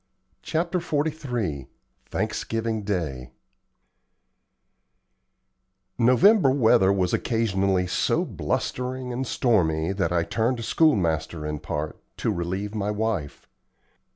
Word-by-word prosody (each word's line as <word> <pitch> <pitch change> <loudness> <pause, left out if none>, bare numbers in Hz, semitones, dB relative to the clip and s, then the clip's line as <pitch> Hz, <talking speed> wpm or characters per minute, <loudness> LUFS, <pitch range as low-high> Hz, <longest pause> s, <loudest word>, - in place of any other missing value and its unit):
CHAPTER 170 +3 -1
XLIII 140 - -2 0.4
THANKSGIVING 115 -1 -2
DAY 75 -11 -3 2.7
November 135 - +5
weather 115 -7 +4
was 95 -3 0
occasionally 100 -5 +1
so 90 - +1
blustering 125 0 -3
and 130 +1 -3
stormy 85 -11 +1
that 95 -4 -1
I 85 -1 +2
turned 115 +5 -1
schoolmaster 85 - +1
in 75 -1 -3
part, 75 0 -4 0.2
to - - 0
relieve 95 +4 -3
my 105 -2 -2
wife. 105 -8 -3
105 Hz, 95 wpm, -25 LUFS, 85-125 Hz, 2.7 s, November